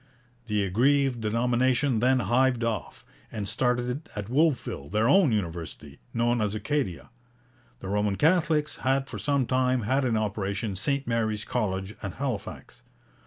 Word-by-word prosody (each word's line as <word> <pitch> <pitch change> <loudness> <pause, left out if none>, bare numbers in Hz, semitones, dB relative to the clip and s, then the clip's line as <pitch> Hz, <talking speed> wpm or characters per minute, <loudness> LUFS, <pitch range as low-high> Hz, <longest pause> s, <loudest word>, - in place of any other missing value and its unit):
The 105 -2 +1
aggrieved 125 +5 +2
denomination 125 +3 +1
then 130 +2 +3
hived 120 +3 +2
off, 115 -2 -3 0.3
and 105 -3 -4
started 125 +5 -1
at 105 0 -5
Wolfville 140 - 0
their 105 +3 +1
own 175 -1 +5
university, 85 -7 -4
known 120 0 +1
as 105 0 0
Acadia. 110 - -2 0.7
The - - -6
Roman 105 0 0
Catholics 160 - +2
had 135 +1 0
for - - -7
some 140 -3 +1
time 130 0 +1
had 135 +6 +1
in 120 -4 +1
operation 105 -1 -2
St 140 +8 -1
Mary's 110 -3 -1
College 95 -3 -2
at 100 -3 -5
Halifax. 130 -8 -5
120 Hz, 140 wpm, -27 LUFS, 105-135 Hz, 0.7 s, own